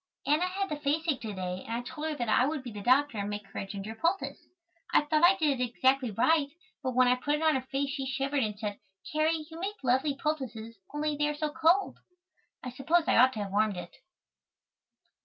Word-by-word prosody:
Anna 300 Hz, +6 st, +2 dB
had 390 Hz, +1 st, -2 dB
the 300 Hz, -, -3 dB
faceache 295 Hz, 0 st, 0 dB
to 220 Hz, -2 st, -5 dB
day 185 Hz, 0 st, -4 dB
and 230 Hz, -, -4 dB
I 235 Hz, -, -1 dB
told 300 Hz, +5 st, -5 dB
her 310 Hz, -, -2 dB
that 240 Hz, -4 st, -3 dB
I 250 Hz, +4 st, +4 dB
would 300 Hz, -2 st, -3 dB
be 245 Hz, -, -7 dB
the 205 Hz, -1 st, -7 dB
doctor 255 Hz, +1 st, +3 dB
and 200 Hz, 0 st, -2 dB
make 205 Hz, 0 st, -5 dB
her -, -, -6 dB
a 195 Hz, -, -5 dB
ginger 200 Hz, +2 st, -6 dB
poultice. 335 Hz, -, -2 dB, 0.4 s
I -, -, +5 dB
thought 305 Hz, +2 st, +1 dB
I 360 Hz, +3 st, +7 dB
did 300 Hz, -8 st, +1 dB
it -, -, +2 dB
exactly 260 Hz, +1 st, +2 dB
right 280 Hz, +8 st, +2 dB, 0.3 s
but 260 Hz, -3 st, -3 dB
when 255 Hz, 0 st, +5 dB
I 250 Hz, -, +5 dB
put 290 Hz, +4 st, 0 dB
it 305 Hz, -, -3 dB
on 315 Hz, -1 st, +4 dB
her 265 Hz, -, 0 dB
face 275 Hz, 0 st, -1 dB
she 270 Hz, -1 st, -3 dB
shivered 275 Hz, +1 st, -1 dB
and 210 Hz, -1 st, -3 dB
said: 205 Hz, -1 st, -4 dB, 0.3 s
"Carrie, 310 Hz, 0 st, +1 dB
you 325 Hz, -, -8 dB
make 400 Hz, +4 st, -3 dB
lovely 260 Hz, +3 st, +2 dB
poultices 250 Hz, -7 st, -4 dB
only 295 Hz, 0 st, -1 dB
they 295 Hz, 0 st, +1 dB
are 295 Hz, -, -3 dB
so 305 Hz, 0 st, -1 dB
cold." 330 Hz, +5 st, +2 dB, 0.6 s
I 250 Hz, -, -5 dB
suppose 315 Hz, +7 st, +2 dB
I -, -, +3 dB
ought 255 Hz, +2 st, +6 dB
to 210 Hz, -, -3 dB
have 195 Hz, -, -7 dB
warmed 210 Hz, -1 st, +1 dB
it. 175 Hz, 0 st, -8 dB
275 Hz, 230 wpm, -29 LUFS, 230-310 Hz, 0.6 s, I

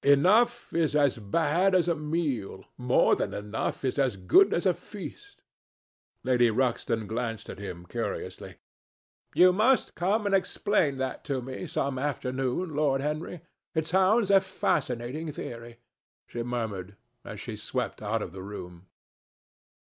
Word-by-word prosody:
Enough 210 Hz, -, +4 dB
is 160 Hz, -3 st, +1 dB
as 140 Hz, -5 st, +3 dB
bad 165 Hz, -, +2 dB
as 175 Hz, -2 st, +3 dB
a 170 Hz, -, +3 dB
meal. 150 Hz, -, -2 dB
More 125 Hz, 0 st, +3 dB
than -, -, -3 dB
enough 105 Hz, +6 st, -3 dB
is 130 Hz, +2 st, 0 dB
as 130 Hz, -7 st, +1 dB
good 95 Hz, -, +5 dB
as 170 Hz, -, 0 dB
a 185 Hz, -, +4 dB
feast." 315 Hz, -, -10 dB, 0.8 s
Lady 125 Hz, -2 st, +4 dB
Ruxton 115 Hz, -2 st, 0 dB
glanced 115 Hz, +1 st, -4 dB
at -, -, -10 dB
him 90 Hz, -4 st, -7 dB
curiously. -, -, -5 dB, 0.8 s
"You 180 Hz, 0 st, +7 dB
must 225 Hz, +6 st, +3 dB
come 205 Hz, +5 st, 0 dB
and 200 Hz, -, +1 dB
explain 190 Hz, -5 st, +1 dB
that 130 Hz, 0 st, -3 dB
to 135 Hz, -2 st, -1 dB
me 130 Hz, +7 st, -6 dB
some 140 Hz, -5 st, -1 dB
afternoon, 135 Hz, +3 st, -2 dB
Lord 145 Hz, -2 st, +2 dB
Henry. 155 Hz, +3 st, -3 dB, 0.3 s
It 160 Hz, -1 st, +1 dB
sounds 190 Hz, +5 st, +3 dB
a 195 Hz, -1 st, +7 dB
fascinating 150 Hz, -5 st, -2 dB
theory," 115 Hz, -3 st, -8 dB, 0.5 s
she 120 Hz, -, -5 dB
murmured, 110 Hz, -5 st, -4 dB, 0.3 s
as -, -, -8 dB
she -, -, -6 dB
swept -, -, -3 dB
out 110 Hz, +1 st, -1 dB
of -, -, -7 dB
the 95 Hz, +1 st, -8 dB
room. 90 Hz, -2 st, -9 dB
140 Hz, 145 wpm, -28 LUFS, 115-180 Hz, 0.8 s, You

